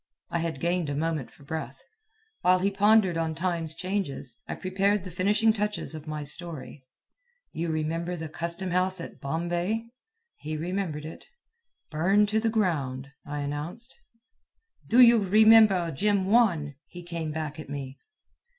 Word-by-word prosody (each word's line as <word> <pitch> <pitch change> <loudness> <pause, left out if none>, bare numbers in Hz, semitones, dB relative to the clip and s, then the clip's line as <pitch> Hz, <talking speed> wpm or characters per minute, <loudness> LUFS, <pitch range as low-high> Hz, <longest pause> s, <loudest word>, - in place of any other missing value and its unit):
I 170 - 0
had 165 -4 -3
gained 170 0 0
a 145 - -2
moment 155 -3 -2
for - - -19
breath. 140 -3 -5 0.6
While 180 +1 +5
he 195 +2 +1
pondered 200 -3 +4
on 160 -1 -1
time's 165 -2 -2
changes, 180 - -4
I - - -4
prepared 195 +1 0
the 185 - -8
finishing 210 +5 +3
touches 210 -4 -3
of 155 0 -9
my 155 -1 -4
story. 150 -3 -8 0.6
"You 165 +1 -3
remember 165 +3 -2
the 160 -2 -5
custom 170 +4 -3
house 185 +1 +1
at 170 - -9
Bombay?" 175 +9 -2 0.5
He 155 +1 -5
remembered 170 -2 -3
it. 160 - -10 0.6
"Burned 195 +7 +3
to 215 +1 +2
the 225 +1 +1
ground," 140 - -1 0.2
I 145 0 -3
announced. 150 - -5 0.9
"Do 250 - +6
you 235 -1 +8
remember 210 -3 +6
Jim 200 +5 +1
Wan?" 190 -9 +3
he 175 0 -10
came 170 -2 -4
back 155 0 -4
at 155 - -8
me. 140 -2 -6
170 Hz, 150 wpm, -27 LUFS, 155-200 Hz, 0.9 s, you